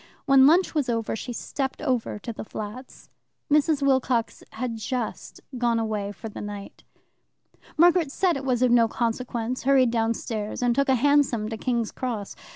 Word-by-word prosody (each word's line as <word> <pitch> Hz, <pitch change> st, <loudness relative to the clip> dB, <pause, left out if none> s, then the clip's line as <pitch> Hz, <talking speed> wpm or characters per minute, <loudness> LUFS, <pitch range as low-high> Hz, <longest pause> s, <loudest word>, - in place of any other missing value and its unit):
When 275 Hz, -1 st, +6 dB
lunch 350 Hz, +5 st, +4 dB
was 290 Hz, -5 st, 0 dB
over 230 Hz, -2 st, -1 dB
she 245 Hz, +3 st, -6 dB
stepped 265 Hz, +3 st, -4 dB
over 255 Hz, -8 st, -1 dB
to 230 Hz, +3 st, -6 dB
the -, -, -7 dB
flats. 215 Hz, +4 st, -9 dB, 0.4 s
Mrs. 300 Hz, -1 st, +3 dB
Wilcox 260 Hz, -4 st, +1 dB
had 230 Hz, 0 st, -4 dB
just 235 Hz, +1 st, -4 dB, 0.2 s
gone 235 Hz, -1 st, +2 dB
away 215 Hz, -3 st, -2 dB
for 225 Hz, -, -8 dB
the 215 Hz, -, -8 dB
night. 205 Hz, -1 st, -8 dB, 0.9 s
Margaret 340 Hz, -2 st, +4 dB
said 370 Hz, +5 st, +1 dB
that 340 Hz, -, +1 dB
it 270 Hz, -, -6 dB
was 255 Hz, -2 st, +1 dB
of 250 Hz, -, +3 dB
no 235 Hz, -1 st, +5 dB
consequence, 235 Hz, +1 st, -2 dB
hurried 265 Hz, -3 st, +4 dB
downstairs, 225 Hz, -1 st, -2 dB
and 245 Hz, -1 st, +3 dB
took 275 Hz, +2 st, +1 dB
a 265 Hz, -, +5 dB
hansom 260 Hz, -5 st, +2 dB
to 225 Hz, -, -4 dB
King's 235 Hz, -2 st, -1 dB
Cross. 230 Hz, -6 st, -4 dB
245 Hz, 170 wpm, -25 LUFS, 225-270 Hz, 0.9 s, When